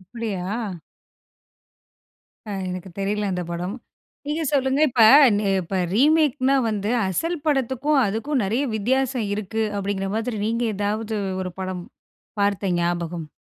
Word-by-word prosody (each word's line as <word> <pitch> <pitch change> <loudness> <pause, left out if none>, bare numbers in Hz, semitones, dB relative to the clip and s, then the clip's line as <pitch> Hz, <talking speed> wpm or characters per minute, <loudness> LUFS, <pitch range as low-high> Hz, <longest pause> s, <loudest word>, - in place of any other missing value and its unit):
அப்பிடியா? 200 -1 -5 2.0
ஆ. - - -4 0.2
எனக்கு 185 +1 -6
தெரியல 205 +1 -1
அந்த 180 0 -2
படம். 180 +4 -3 0.5
நீங்க 305 +3 -1
சொல்லுங்க, 270 0 +2
இப்ப 235 -1 +3 0.3
ந - - +1 0.2
இப்ப 185 +2 -4 0.2
ரீமேக்ன்னா 275 0 +3
வந்து 210 -1 -1 0.2
அசல் 330 - -1
படத்துக்கும் 270 +1 +1
அதுக்கும் 225 +6 -1
நெறைய 230 +8 0
வித்தியாசம் 250 +2 0
இருக்கு, 215 +2 -2
அப்பிடீங்கிற 195 -1 -2
மாரி 225 0 -2
நீங்க 230 +2 0
ஏதாவது 215 +2 -2 0.3
ஒரு 185 -1 -5
படம் 185 -1 -4 0.6
பார்த்த 200 -2 +1
ஞாபகம்? 170 -2 -2
215 Hz, 120 wpm, -23 LUFS, 190-260 Hz, 2.0 s, இப்ப